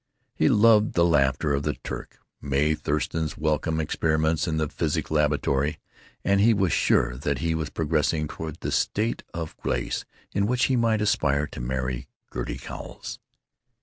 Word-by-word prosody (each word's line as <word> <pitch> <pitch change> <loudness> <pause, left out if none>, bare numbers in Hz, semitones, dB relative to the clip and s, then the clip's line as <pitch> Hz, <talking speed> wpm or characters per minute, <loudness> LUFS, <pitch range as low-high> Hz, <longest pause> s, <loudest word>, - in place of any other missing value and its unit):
He - - +2
loved 110 0 +5
the 85 - +4
laughter 70 -2 +2
of 70 - +1
the - - -1
Turk, - - -7 0.2
Mae 70 +2 +2
Thurston's 75 +1 -2
welcome, 80 +1 0
experiments 80 +1 +1
in 80 -1 0
the 80 -1 +1
physics - - -2
laboratory. 75 -1 +1 0.5
And 100 0 +3
he 115 +1 +5
was 95 -4 +1
sure 60 +1 +2
that 70 +1 -1
he 80 +5 0
was 80 -3 -2
progressing 75 0 0
toward 80 0 -7
the - - -2
state 110 +3 0
of 85 -3 -5
grace - - -2 0.3
in 100 0 +1
which 125 +1 +1
he 130 - +2
might 115 -3 +2
aspire 75 -8 +2
to 70 - -8
marry 65 0 -2 0.3
Gertie - - -3
Cowles. - - -8
80 Hz, 160 wpm, -26 LUFS, 70-85 Hz, 0.5 s, loved